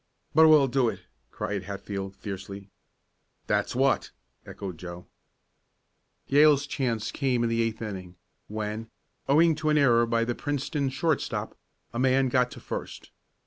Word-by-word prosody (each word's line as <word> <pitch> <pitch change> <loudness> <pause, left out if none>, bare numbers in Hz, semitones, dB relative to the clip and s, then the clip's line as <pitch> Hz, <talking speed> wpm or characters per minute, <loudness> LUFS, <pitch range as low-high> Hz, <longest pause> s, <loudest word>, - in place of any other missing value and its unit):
"But 160 +1 +7
we'll 150 -3 +6
do 130 -2 +2
it!" - - -7 0.3
cried 100 -1 -4
Hatfield, 100 0 -5
fiercely. 100 0 -8 0.7
"That's - - 0
what!" - - +2 0.4
echoed 95 -5 -7
Joe. 90 0 -8 1.2
Yale's 145 0 +5
chance 125 -6 -2
came 130 -4 0
in 115 - +1
the 115 0 +1
eighth 115 0 -2
inning, 95 -4 -6 0.3
when, 110 +1 -4 0.4
owing 160 +4 +5
to 155 0 -1
an 150 - +3
error 120 -5 +4
by 115 0 +1
the 120 - -1
Princeton 145 +1 -2
shortstop, 155 +3 -1 0.4
a 120 - -3
man 130 0 +3
got 125 0 +2
to - - -10
first. - - -7
120 Hz, 145 wpm, -27 LUFS, 100-140 Hz, 1.2 s, But